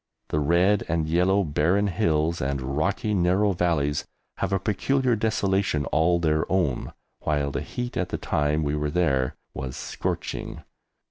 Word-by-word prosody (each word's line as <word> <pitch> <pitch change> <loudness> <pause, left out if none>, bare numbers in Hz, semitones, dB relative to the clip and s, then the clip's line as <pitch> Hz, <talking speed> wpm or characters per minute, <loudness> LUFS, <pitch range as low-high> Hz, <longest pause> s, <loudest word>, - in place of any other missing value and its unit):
The 75 - 0
red 90 +7 +3
and 80 -2 0
yellow 90 +5 +3
barren 85 +6 +2
hills 85 -3 +1
and 70 +1 -1 0.2
rocky 100 +7 0
narrow 95 +2 +3
valleys 80 -5 0 0.3
have 95 - -2
a 95 - +3
peculiar 120 +6 +1
desolation 100 -7 0
all 85 +2 +3
their 80 -2 0
own, 85 -10 0 0.3
while 75 -2 0
the - - -2
heat 125 0 -5
at - - -1
the - - -2
time 75 +1 0
we 75 0 0
were 75 0 -1
there 70 -6 +1 0.2
was 65 -1 -5
scorching. - - -4
85 Hz, 150 wpm, -25 LUFS, 75-95 Hz, 0.3 s, red